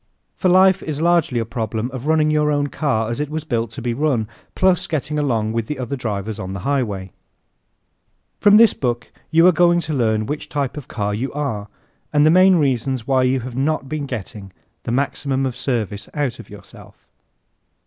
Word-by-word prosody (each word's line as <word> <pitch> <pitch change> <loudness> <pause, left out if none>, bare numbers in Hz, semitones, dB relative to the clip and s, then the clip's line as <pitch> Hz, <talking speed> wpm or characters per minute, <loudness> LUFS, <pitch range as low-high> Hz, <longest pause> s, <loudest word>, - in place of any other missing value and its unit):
For 185 - +1
life 190 +1 +5
is 150 -2 -4
largely 170 -5 +2
a 115 - 0
problem 115 +1 -3
of 130 +2 -6
running 155 -1 +3
your 150 -1 +2
own 145 0 0
car 115 -8 -1
as 115 - -4
it 150 -1 -2
was 155 0 -4
built 115 -6 -2
to 115 +2 -9
be 120 -1 -1
run, 130 -5 0 0.3
plus 185 -2 +2
getting 150 -1 -2
along 115 -6 0
with 115 -1 -2
the 150 - -4
other 130 +1 -3
drivers 110 -3 -4
on 95 -1 -5
the 95 - -5
highway. 105 -8 -2 1.3
From 205 0 +6
this 225 -1 +6
book 120 -3 -3 0.2
you 165 +1 +5
are 180 - +8
going 175 0 +4
to 160 -2 -4
learn 110 -5 +1
which 145 +6 -5
type 140 0 -2
of 150 -4 -8
car 105 -2 -2
you 125 +6 -3
are 135 -9 -3 0.4
and 145 0 +4
the 155 - +6
main 185 +2 +6
reasons 130 -5 0
why 130 -1 +2
you 130 0 +1
have 125 0 -7
not 140 +1 -1
been 145 0 -4
getting 105 -5 -7 0.3
the - - -2
maximum 135 +1 -1
of 130 -2 -3
service 110 -6 -3
out 145 -5 -2
of - - -11
yourself. - - -15
135 Hz, 200 wpm, -20 LUFS, 115-150 Hz, 1.3 s, are